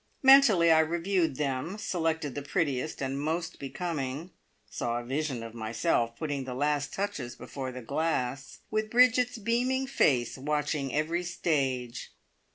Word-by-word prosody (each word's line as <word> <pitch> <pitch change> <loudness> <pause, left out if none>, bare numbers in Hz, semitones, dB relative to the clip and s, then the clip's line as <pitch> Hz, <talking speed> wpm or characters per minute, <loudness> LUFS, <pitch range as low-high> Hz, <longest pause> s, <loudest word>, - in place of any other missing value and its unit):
Mentally 255 -11 +7
I 160 - +6
reviewed 170 0 +1
them, 140 +6 -2
selected 160 - -1
the 145 - -4
prettiest 140 -1 -1
and 135 +1 -2
most 165 +2 -2
becoming, 145 +1 -4 0.4
saw 120 0 -2
a 120 - -4
vision 135 -2 -2
of 115 -1 -8
myself 115 +1 0
putting 145 -4 -3
the 125 -1 -5
last 145 +1 0
touches 170 - -3
before 130 -2 -6
the 125 -1 -8
glass, 135 -2 -2
with 215 0 0
Bridget's 250 +1 +4
beaming 245 +4 0
face 130 - +1
watching 145 -1 -1
every 160 +4 0
stage. 135 -9 -2
150 Hz, 140 wpm, -29 LUFS, 130-175 Hz, 0.4 s, Mentally